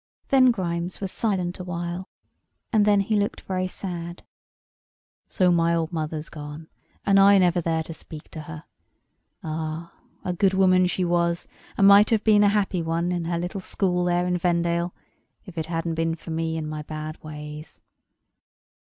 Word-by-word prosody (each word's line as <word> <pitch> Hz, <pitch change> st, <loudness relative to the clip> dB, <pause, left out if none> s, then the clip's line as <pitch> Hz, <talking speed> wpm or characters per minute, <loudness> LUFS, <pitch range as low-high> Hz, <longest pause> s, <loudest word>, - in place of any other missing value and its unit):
Then 260 Hz, -2 st, +6 dB
Grimes 175 Hz, -5 st, -2 dB
was 195 Hz, -2 st, -3 dB
silent 185 Hz, -5 st, -1 dB
awhile; 175 Hz, 0 st, -4 dB, 0.6 s
and 210 Hz, -2 st, +4 dB
then 205 Hz, -1 st, +4 dB
he 215 Hz, +2 st, 0 dB
looked 205 Hz, 0 st, 0 dB
very 185 Hz, -1 st, -2 dB
sad. 175 Hz, -2 st, -6 dB, 1.1 s
"So 185 Hz, -2 st, +3 dB
my 170 Hz, 0 st, +3 dB
old 165 Hz, +1 st, -2 dB
mother's 155 Hz, -1 st, -3 dB
gone, 150 Hz, +1 st, -9 dB, 0.4 s
and 195 Hz, -1 st, +5 dB
I 200 Hz, +1 st, +7 dB
never 180 Hz, -1 st, +3 dB
there 160 Hz, -1 st, 0 dB
to 165 Hz, -, -8 dB
speak 155 Hz, -1 st, -10 dB
to 155 Hz, -, -7 dB
her! 155 Hz, 0 st, -9 dB, 0.8 s
Ah! 160 Hz, +1 st, -4 dB, 0.3 s
a 180 Hz, -, 0 dB
good 190 Hz, +2 st, +2 dB
woman 185 Hz, -1 st, +4 dB
she 180 Hz, 0 st, -1 dB
was, 170 Hz, 0 st, 0 dB, 0.3 s
and 195 Hz, -, +6 dB
might 200 Hz, +1 st, +8 dB
have 220 Hz, -2 st, +2 dB
been 210 Hz, -2 st, +5 dB
a 205 Hz, -, +5 dB
happy 200 Hz, -3 st, +1 dB
one, 165 Hz, +2 st, -1 dB
in 175 Hz, -2 st, -2 dB
her 170 Hz, 0 st, -1 dB
little 175 Hz, +3 st, -4 dB
school 180 Hz, -1 st, 0 dB
there 175 Hz, 0 st, +1 dB
in 180 Hz, 0 st, 0 dB
Vendale, 170 Hz, 0 st, +1 dB, 0.5 s
if 185 Hz, -, -11 dB
it 160 Hz, -1 st, -3 dB
hadn't 165 Hz, 0 st, -2 dB
been 165 Hz, 0 st, 0 dB
for 165 Hz, 0 st, -9 dB
me 160 Hz, 0 st, -1 dB
and 155 Hz, -1 st, -3 dB
my 155 Hz, 0 st, -4 dB
bad 155 Hz, +1 st, -7 dB
ways." 150 Hz, 0 st, -8 dB
175 Hz, 170 wpm, -25 LUFS, 165-185 Hz, 1.1 s, might